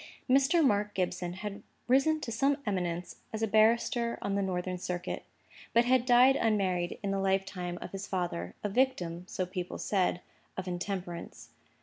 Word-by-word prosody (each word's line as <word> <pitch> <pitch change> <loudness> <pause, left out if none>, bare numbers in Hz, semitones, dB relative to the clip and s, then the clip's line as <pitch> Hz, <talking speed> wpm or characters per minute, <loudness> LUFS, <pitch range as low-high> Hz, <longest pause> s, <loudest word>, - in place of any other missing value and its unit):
Mr. 275 +5 +4
Mark 205 -3 +1
Gibson 180 -1 -1
had 205 +2 -6 0.3
risen 275 +5 +4
to 230 - -4
some 275 +5 +2
eminence 180 -4 -2
as 220 0 -3
a - - +2
barrister 235 +2 +3
on 200 - -2
the 200 - +1
Northern 185 -1 -2
Circuit, 180 0 -4 0.5
but 235 +1 +5
had 255 0 +3
died 250 +2 +7
unmarried 190 -7 +1
in 200 - -1
the 195 - 0
lifetime 190 -2 -1
of - - -8
his 195 +1 -5
father, 170 - -3
a 205 - 0
victim 185 -8 0
(so 185 - -2
people 180 -1 -5
said) 185 -3 +1 0.4
to 185 0 -4
intemperance. 175 -1 -5
195 Hz, 160 wpm, -30 LUFS, 180-235 Hz, 0.5 s, died